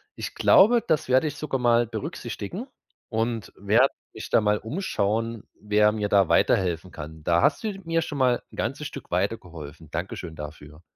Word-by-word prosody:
Ich - - -6
glaube, 230 +4 +5
das 155 -4 +1
werde 130 +4 +4
ich 145 - -4
sogar 150 -3 -3
mal 120 -1 +3
berücksichtigen 120 - -6 0.4
und 115 -1 -2
werde 110 +7 +4 0.2
mich - - -8
da - - +4
mal 105 0 +2
umschauen, 115 - -2 0.2
wer 105 0 +3
mir 105 -1 -2
da 100 -4 +4
weiterhelfen 90 -1 +2
kann. 80 0 -9
Da 85 +2 +3
hast - - +2
du 220 - -1
mir 165 0 +1
schon 150 -2 -5
mal 125 -2 +2
'n - - -13
ganzes 140 +5 -2
Stück - - -10
weitergeholfen. 85 -5 -4
Danke 85 +4 -3
schön 85 -3 -8
dafür. 75 +1 -10
110 Hz, 175 wpm, -25 LUFS, 90-130 Hz, 0.4 s, glaube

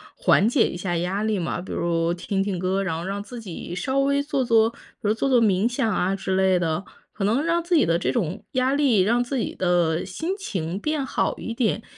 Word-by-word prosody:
缓 - - +3
解 240 +1 +3
一 - - -5
下 175 -1 -2
压 185 +5 -1
力 215 -2 0
嘛。 175 - -2
比 185 - -9
如 170 0 0
听 195 +2 -2
听 195 -3 -2
歌 185 +2 0
儿， - - -1
然 185 -4 -2
后 165 - -4
让 200 +2 -3
自 240 +2 -9
己 175 -4 -7
稍 260 +10 -2
微 280 +1 +2
做 280 -2 -1
做 225 -1 +4
比 235 - -17 0.3
如 210 - +1
做 250 - 0
做 255 -3 +4
冥 205 -1 +3
想 245 -2 0
啊 190 -1 +1
之 190 -1 -2
类 190 -1 +3
的。 165 +2 -1 0.3
可 200 - -3
能 235 +9 +2
让 335 +1 +1
自 345 +1 +1
己 305 - +5
的 170 0 +2
这 - - 0
种 195 - -2
压 260 0 +2
力、 270 -9 +3
让 235 +6 +2
自 260 +2 -3
己 - - -2
的 175 -3 +1
心 320 - -3
情 185 - -4
变 300 +3 -1
好 - - -1
一 230 - -5
点， 225 -1 0
205 Hz, 260 characters per minute, -24 LUFS, 180-255 Hz, 0.3 s, 己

